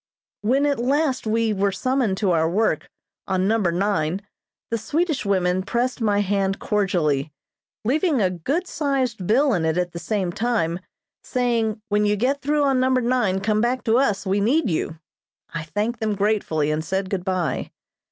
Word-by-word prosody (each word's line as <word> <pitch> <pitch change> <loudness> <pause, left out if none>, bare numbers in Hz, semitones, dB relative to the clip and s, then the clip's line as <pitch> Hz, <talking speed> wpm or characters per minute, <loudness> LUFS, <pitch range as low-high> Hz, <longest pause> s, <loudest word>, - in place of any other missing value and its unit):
When 260 +7 +2
at 285 -4 +1
last 265 0 +1
we 225 0 +1
were 200 0 +1
summoned 245 -1 0
to 195 -2 +1
our 160 -1 +2
work, 215 +6 0 0.4
on 190 0 +1
Number 210 -5 +2
Nine, 180 -1 0 0.5
the 230 - 0
Swedish 310 - -1
women 185 -2 +2
pressed 240 +5 -1
my 205 -2 +2
hand 195 -1 0
cordially, 165 -9 0 0.5
leaving 300 - +2
a 185 -3 +2
good 275 - -2
sized 260 - -1
bill 265 +4 +3
in 175 -5 0
it 160 +1 +1
at 180 -1 0
the 170 - -6
same 185 +1 -1
time, 180 -6 0 0.4
saying: 230 -4 0
"When 210 0 +2
you 205 - +2
get 260 +7 0
through 295 +1 +1
on 270 -2 +2
Number 255 0 +2
Nine 235 -6 +1
come 215 +1 +1
back 245 +2 0
to 230 +2 +3
us; 210 -8 +1
we 195 +1 +1
need 245 - +2
you." 160 0 -2 0.6
I 165 - -2
thanked 210 +8 -2
them 215 -2 -1
gratefully 195 -7 0
and 155 +1 -1
said 190 +2 -2
good 190 -3 -1
bye. 185 -3 -1
210 Hz, 175 wpm, -23 LUFS, 185-250 Hz, 0.6 s, bill